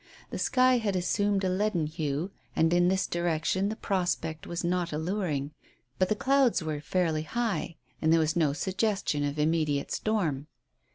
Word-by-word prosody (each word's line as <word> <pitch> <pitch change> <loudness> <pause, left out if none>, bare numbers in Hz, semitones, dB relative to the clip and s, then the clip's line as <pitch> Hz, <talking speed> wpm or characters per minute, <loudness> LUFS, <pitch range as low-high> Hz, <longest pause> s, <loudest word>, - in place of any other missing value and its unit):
The - - -4
sky 255 -1 +4
had 205 -4 -1
assumed 200 +2 +1
a - - +2
leaden 185 -3 +1
hue, 155 +2 -3 0.2
and 160 +1 +3
in 175 0 +4
this 190 +1 +2
direction 175 +3 0
the 220 - -3
prospect 175 -6 -2
was 170 0 -3
not 175 0 0
alluring, 155 -3 -2 0.5
but 185 - +2
the 215 - +2
clouds 265 -5 +2
were 155 -2 -3
fairly 165 -2 0
high 195 -3 -2 0.3
and 160 - +3
there 165 - +5
was 155 -1 +1
no 160 -4 +3
suggestion 190 -1 -1
of 145 +1 -2
immediate 150 -2 +1
storm. 160 -10 -1
175 Hz, 165 wpm, -28 LUFS, 155-200 Hz, 0.5 s, there